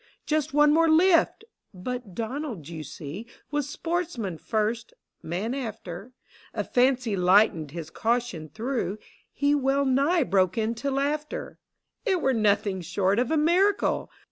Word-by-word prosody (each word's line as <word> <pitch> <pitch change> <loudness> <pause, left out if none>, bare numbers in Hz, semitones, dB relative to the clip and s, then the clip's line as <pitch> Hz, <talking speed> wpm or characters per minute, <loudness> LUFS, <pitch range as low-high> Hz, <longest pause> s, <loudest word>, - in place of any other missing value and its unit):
Just 310 0 0
one 295 +1 +5
more 330 +1 +4
lift! 335 +5 +4 0.3
But 230 0 -6
Donald, 230 - -4
you 160 -2 -6
see, 155 - -8 0.2
Was 290 -1 -1
sportsman 305 - -3
first, 225 +1 -2 0.3
man 190 +9 -3
after: 220 -5 -6 0.4
A - - 0
fancy 250 -3 +2
lightened 180 -4 +4
his 160 +1 -7
caution 230 -9 -1
through, 225 - -2 0.2
— - - -32
He 285 +1 +1
wellnigh 280 +3 +2
broke 190 -4 +1
into 230 +5 -1
laughter: 290 +2 -2 0.2
" - - -55
It 385 -6 +1
were 265 -4 +2
nothing 205 -3 +1
short 195 +4 +1
of 245 - +1
a 320 - +2
miracle 365 +6 +2
245 Hz, 140 wpm, -26 LUFS, 195-290 Hz, 0.4 s, one